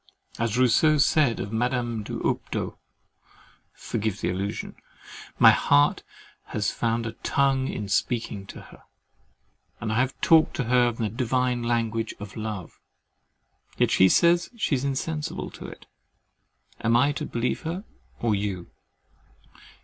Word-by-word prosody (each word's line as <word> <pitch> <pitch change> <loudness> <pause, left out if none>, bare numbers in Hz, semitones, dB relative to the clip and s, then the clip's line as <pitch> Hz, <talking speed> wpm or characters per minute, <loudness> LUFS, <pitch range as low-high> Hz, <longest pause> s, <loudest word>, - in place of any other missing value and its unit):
As 115 0 0
Rousseau 140 +5 +4
said 145 -3 +3
of 100 - -5
Madame 120 -1 -1
d'Houptot 105 - -3 1.0
(forgive 110 -3 -3
the - - -1
allusion) 100 +3 -4 0.6
my - - +8
heart 145 +1 +3 0.4
has 105 - -1
found 115 0 -1
a 115 - -3
tongue 135 +3 0
in 105 -6 -4
speaking 100 -1 -1
to - - -10
her, - - -16 1.0
and 110 -1 -2
I 115 - +1
have 130 +1 -1
talked 160 -1 +4
to 135 - -1
her 120 0 +3
the 115 -1 -2
divine 125 +1 0
language 115 -1 -1
of 100 -1 -9
love. 105 -5 -6 1.0
Yet - - +2
she 95 - +5
says, 170 - +4
she 210 - 0
is 130 -1 +1
insensible 150 +3 -3
to - - -9
it. - - -12 1.0
Am 115 +1 +4
I 140 +4 +3
to 150 +1 -4
believe 120 +1 -2
her 170 +5 -4 0.4
or 115 -2 +1
you? 100 -3 -3
120 Hz, 135 wpm, -25 LUFS, 110-135 Hz, 1.0 s, my